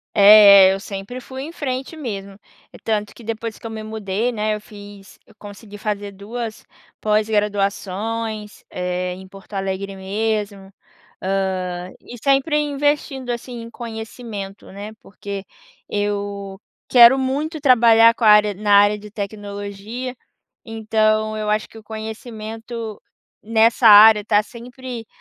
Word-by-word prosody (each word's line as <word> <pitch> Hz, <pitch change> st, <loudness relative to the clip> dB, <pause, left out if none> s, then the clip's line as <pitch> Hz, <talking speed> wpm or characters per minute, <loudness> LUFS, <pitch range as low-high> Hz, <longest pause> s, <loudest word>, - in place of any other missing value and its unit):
É, 200 Hz, -2 st, +9 dB
é, -, -, +1 dB
eu 195 Hz, -, -5 dB
sempre 200 Hz, +4 st, -7 dB
fui 260 Hz, +1 st, -8 dB
em 310 Hz, +4 st, -7 dB
frente 270 Hz, 0 st, -4 dB
mesmo. 200 Hz, -9 st, -6 dB, 0.5 s
Tanto 210 Hz, -2 st, -2 dB
que 235 Hz, -, -14 dB
depois 225 Hz, 0 st, -5 dB
que -, -, -10 dB
eu -, -, -6 dB
me 220 Hz, -1 st, -6 dB
mudei, 215 Hz, +1 st, -2 dB
né, 215 Hz, -2 st, -1 dB
eu 210 Hz, -, -6 dB
fiz 205 Hz, -1 st, -14 dB
eu 220 Hz, -, -21 dB
consegui 205 Hz, 0 st, -11 dB
fazer 205 Hz, -1 st, -4 dB
duas 220 Hz, +3 st, -7 dB, 0.4 s
pós-graduações, 210 Hz, 0 st, -1 dB
eh, 180 Hz, 0 st, -3 dB
em 190 Hz, +1 st, -11 dB
Porto 195 Hz, +2 st, -14 dB
Alegre 195 Hz, 0 st, -4 dB
mesmo. 200 Hz, 0 st, -3 dB, 0.5 s
Hã, 185 Hz, -2 st, -2 dB
e 245 Hz, -, -11 dB
sempre 275 Hz, +2 st, +2 dB
investindo, 290 Hz, -2 st, -1 dB
assim, 240 Hz, 0 st, -5 dB
em 230 Hz, -, -10 dB
conhecimento, 220 Hz, -3 st, -8 dB
né, 205 Hz, +2 st, -8 dB
porque 200 Hz, 0 st, -8 dB, 0.4 s
eu 200 Hz, -1 st, -3 dB, 0.3 s
quero 245 Hz, +1 st, +8 dB
muito 290 Hz, +5 st, -2 dB
trabalhar 230 Hz, -4 st, +6 dB
com 230 Hz, -, -3 dB
a -, -, +6 dB
área 210 Hz, -1 st, +6 dB
na 205 Hz, +1 st, -1 dB
área 205 Hz, +1 st, +5 dB
de 210 Hz, 0 st, -12 dB
tecnologia. 205 Hz, +4 st, -6 dB, 0.5 s
Então 215 Hz, -1 st, 0 dB
eu 215 Hz, 0 st, -3 dB
acho 215 Hz, 0 st, 0 dB
que 225 Hz, -, -14 dB
o -, -, -13 dB
conhecimento 220 Hz, 0 st, -7 dB, 0.4 s
nessa 225 Hz, +2 st, +4 dB
área 210 Hz, 0 st, +9 dB
tá 205 Hz, 0 st, +3 dB
sempre 245 Hz, +1 st, -9 dB
215 Hz, 140 wpm, -20 LUFS, 200-230 Hz, 0.5 s, É